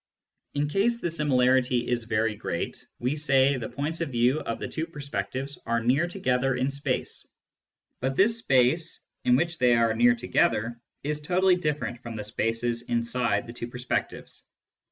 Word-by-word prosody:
In 145 +1 +1
case 205 +9 +1
the 170 - -2
similarity 130 -5 +2
is 120 -2 -1
very 110 -1 0
great, 85 -4 -4
we 125 +4 -1
say 140 -2 +3
the 115 -3 -5
points 150 +6 -3
of 165 - -1
view 125 +3 +2
of 115 - -3
the - - -5
two 160 +1 -3
perspectives 140 - -4
are 115 0 +2
near 130 +8 +2
together 135 -8 0
in 130 +2 0
space; 140 -2 -2 0.7
but 135 +1 -1
this 225 +6 +3
space 140 - +2 0.2
in 125 - +5
which 165 +4 0
they 125 -1 +5
are 115 -1 +3
near 245 0 +5
together 120 - 0 0.2
is 150 +1 -2
totally 180 +4 +3
different 150 -8 -2
from 115 -2 -7
the 105 - -4
spaces 115 +2 -1
inside 115 -3 0
the 115 - -9
two 120 -1 -5
perspectives. 125 +1 -4
130 Hz, 165 wpm, -27 LUFS, 120-150 Hz, 0.7 s, in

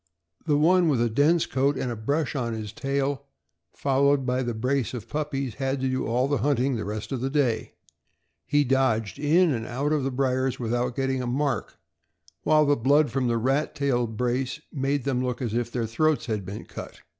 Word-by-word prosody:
The 145 - +3
one 175 +3 +4
with 135 -5 +2
a 120 -1 +1
dense 155 +7 +3
coat 135 +1 +1
and 125 - -2
a - - -3
brush 140 +7 -1
on 120 -4 -1
his 110 -1 -5
tail, 140 +2 -2 0.4
followed 140 0 +2
by 125 0 0
the 120 -3 -2
brace 130 +2 -1
of 115 -2 -7
puppies, 140 -3 -3
had 135 +2 -2
to 130 - +1
do 130 0 -1
all 125 +4 +1
our 145 - +2
hunting 135 -2 +1
the 110 - -3
rest 105 +4 -5
of 130 -3 -2
the 135 - -1
day. 130 -6 0 0.7
He 145 0 +3
dodged 120 -7 +1
in 160 +2 +4
and 115 -2 -3
out 140 +5 -1
of 150 -3 +1
the 135 - 0
briers 130 0 0
without 120 +1 -1
getting 135 -1 0
a 125 - -3
mark, 135 +3 -1 0.6
while 155 -1 +4
the 145 0 +4
blood 140 +4 +3
from 130 -2 0
the 115 -1 +1
rat 135 +6 0
tailed 120 -5 0
brace 125 +3 -1
made 140 -1 0
them 130 -2 0
look 125 -1 -2
as 120 -5 -3
if 120 0 -1
their 120 -2 -1
throats 155 +7 +1
had 105 -5 -3
been 100 +3 -6
cut. - - -9
130 Hz, 205 wpm, -26 LUFS, 120-140 Hz, 0.7 s, one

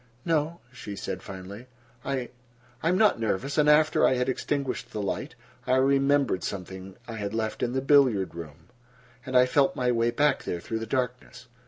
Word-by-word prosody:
"No," 165 +1 0
she 105 -5 -7
said - - -5
finally. 100 +5 -9 0.4
"I—I 120 0 -5
am 180 - +2
not 215 - +4
nervous, 115 +7 -1
and 150 0 +4
after 155 +1 +4
I - - +5
had 125 +1 0
extinguished 135 -2 -2
the 110 - -4
light, 100 -2 -3 0.3
I 130 - +3
remembered 135 -4 +2
something 95 0 -6
I 115 -1 -6
had 105 0 -4
left 110 -1 -2
in 120 - 0
the 130 - 0
billiard 130 -9 +3
room, 80 0 -10 0.6
and 130 -1 +2
I 125 - +7
felt 135 +2 +2
my 125 -1 +1
way 115 0 +2
back 140 +4 +2
there 85 - -3
through 110 +6 -4
the 115 - -5
darkness." 125 0 -3
125 Hz, 180 wpm, -27 LUFS, 110-140 Hz, 0.6 s, I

